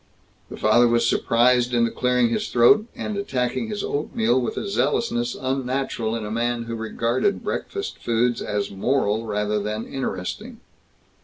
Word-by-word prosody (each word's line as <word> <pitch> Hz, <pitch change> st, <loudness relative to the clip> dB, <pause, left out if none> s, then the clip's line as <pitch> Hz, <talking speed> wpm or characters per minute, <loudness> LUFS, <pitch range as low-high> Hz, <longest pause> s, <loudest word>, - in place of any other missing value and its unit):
The -, -, -8 dB
father 120 Hz, +3 st, +4 dB
was 115 Hz, 0 st, +2 dB
surprised 125 Hz, +1 st, +3 dB
into 115 Hz, -1 st, +2 dB
clearing 125 Hz, -1 st, +2 dB
his 115 Hz, -, -1 dB
throat, 205 Hz, -, +5 dB
and 215 Hz, -, -4 dB
attacking 135 Hz, -, -1 dB
his 210 Hz, -2 st, -4 dB
oatmeal 125 Hz, -4 st, 0 dB
with 120 Hz, -, -3 dB
a -, -, -3 dB
zealousness 120 Hz, -7 st, 0 dB
unnatural 130 Hz, -3 st, -2 dB
in 110 Hz, -2 st, -4 dB
a 105 Hz, -, -5 dB
man 120 Hz, +1 st, -1 dB
who 115 Hz, 0 st, -6 dB
regarded 115 Hz, -, -1 dB
breakfast 400 Hz, 0 st, -4 dB
foods 120 Hz, +1 st, 0 dB
as 105 Hz, -1 st, -2 dB
moral 110 Hz, +1 st, 0 dB
rather 105 Hz, 0 st, 0 dB
than 105 Hz, +2 st, -3 dB
interesting. 95 Hz, -9 st, -5 dB
120 Hz, 150 wpm, -23 LUFS, 115-130 Hz, -, throat